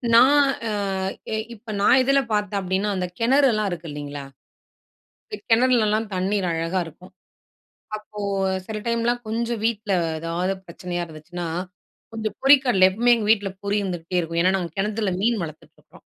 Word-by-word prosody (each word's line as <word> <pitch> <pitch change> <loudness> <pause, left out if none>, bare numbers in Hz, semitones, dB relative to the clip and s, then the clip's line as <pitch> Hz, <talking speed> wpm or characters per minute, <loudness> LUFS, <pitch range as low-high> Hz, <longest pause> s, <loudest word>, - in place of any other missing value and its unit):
நான் 275 +5 +7 0.3
அ - - -2 0.8
இப்ப 220 0 -8
நான் 255 +6 +6
இதுல 275 +2 +4
பார்த்தேன் 205 -1 0
அப்படின்னா, 190 +2 -1
அந்த 180 -1 -1
கிணறு 270 +5 +4
எல்லாம் 215 -1 0
இருக்குது 165 -2 -6
இல்லங்களா? 145 -1 -6 1.0
இந்த 420 - -6
கிணறுலலாம் 225 -2 +3
தண்ணீர் 190 +1 0
அழகா 165 +3 -1
இருக்கும். 180 +4 -13 0.9
அப்போ 210 0 -11 0.5
சில 220 +1 -5
டைம்லாம் 235 +1 0
கொஞ்சம் 230 0 -2
வீட்ல 215 -2 -1 0.3
எதாவது 170 +3 -1
பிரச்சனையா 175 0 -5
இருந்துச்சுன்னா, 170 +2 -7 0.7
கொஞ்சம் 220 -1 -3
பொரிக்கடல, 265 -9 +6
எப்பவுமே 240 +6 +3
எங்க 220 -3 -2
வீட்ல 205 -3 +2
பொரி 200 +1 0
இருந்துகிட்டே 180 -1 -3
இருக்கும். 165 0 -2
ஏன்னா, 185 +1 +4
நாங்க 175 -3 -4
கிணத்துல 210 0 0
மீன் 230 +1 +2
வளர்த்துட்டு 155 -2 -10
இருக்குறோம். - - -20
205 Hz, 145 wpm, -23 LUFS, 180-230 Hz, 1.0 s, நான்